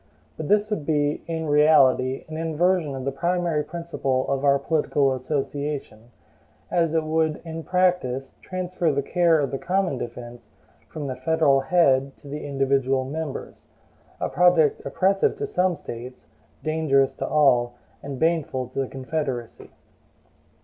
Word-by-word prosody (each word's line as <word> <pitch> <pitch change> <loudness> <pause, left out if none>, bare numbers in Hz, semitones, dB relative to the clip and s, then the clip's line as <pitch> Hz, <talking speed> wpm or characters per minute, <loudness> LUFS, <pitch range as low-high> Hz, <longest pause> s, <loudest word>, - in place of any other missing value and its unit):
But 155 - -5
this 210 +1 +2
would 185 -8 -1
be, 145 -1 0
in 165 -1 -3
reality, 140 -4 +4
an 155 - -7
inversion 165 -1 0
of 130 -1 -6
the 140 - 0
primary 170 +1 0
principle 155 -6 -2
of 135 0 -1
our 140 -1 +5
political 140 -2 +1
association, 135 -3 -4 0.6
as 165 -2 +1
it 160 - +2
would 155 0 0
in 165 0 -5
practice 175 -8 0
transfer 180 -2 -2
the 140 0 -1
care 170 +1 +3
of 140 -2 -1
the 135 - -3
common 185 -6 0
defense 120 0 -8 0.4
from 150 -2 -6
the 130 -2 -3
federal 160 -4 +2
head 135 -2 +2
to - - -16
the 145 +2 -6
individual 135 -1 +1
members: 150 +1 -6 0.5
a - - -1
project 175 -4 +3
oppressive 195 - +2
to 430 0 -3
some 185 - +1
States, 125 -3 -9 0.3
dangerous 155 -4 +2
to - - -3
all, 125 -5 +3 0.3
and 140 -1 -6
baneful 155 -5 0
to - - -5
the 135 - 0
Confederacy. 130 -3 -4
150 Hz, 145 wpm, -24 LUFS, 135-165 Hz, 0.6 s, our